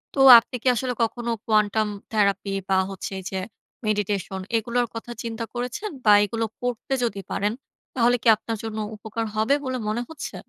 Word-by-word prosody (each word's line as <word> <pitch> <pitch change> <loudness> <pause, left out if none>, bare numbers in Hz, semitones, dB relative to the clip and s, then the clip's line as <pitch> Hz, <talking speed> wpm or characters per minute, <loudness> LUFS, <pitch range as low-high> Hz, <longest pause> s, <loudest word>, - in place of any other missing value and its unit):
তো - - -2 0.2
আপনি 240 - -9
কি - - -1
আসলে 250 +1 -1
কখনো 235 +1 -2
Quantum 215 0 +2 0.2
Therapy 200 -2 +1 0.2
বা 190 - +3
হচ্ছে 195 - -6
এই - - -9
যে 190 - -2 0.5
Meditation 205 -2 -1 0.2
এগুলোর 240 +2 0
কথা 230 +1 -6
চিন্তা 230 0 -4
করেছেন? 250 - -4 0.2
বা 210 - +8
এগুলো 225 +2 -2 0.2
করতে 245 +1 -3
যদি 200 -4 -2
পারেন 205 +2 0 0.4
তাহলে 245 -1 +4
কি - - 0
আপনার 225 0 -4
জন্য 220 -1 -5 0.2
উপকার 220 +2 -4
হবে 220 +6 +3
বলে 260 0 -2
মনে 220 +3 -1
হচ্ছে? 320 -2 -7
225 Hz, 170 wpm, -24 LUFS, 210-240 Hz, 0.5 s, বা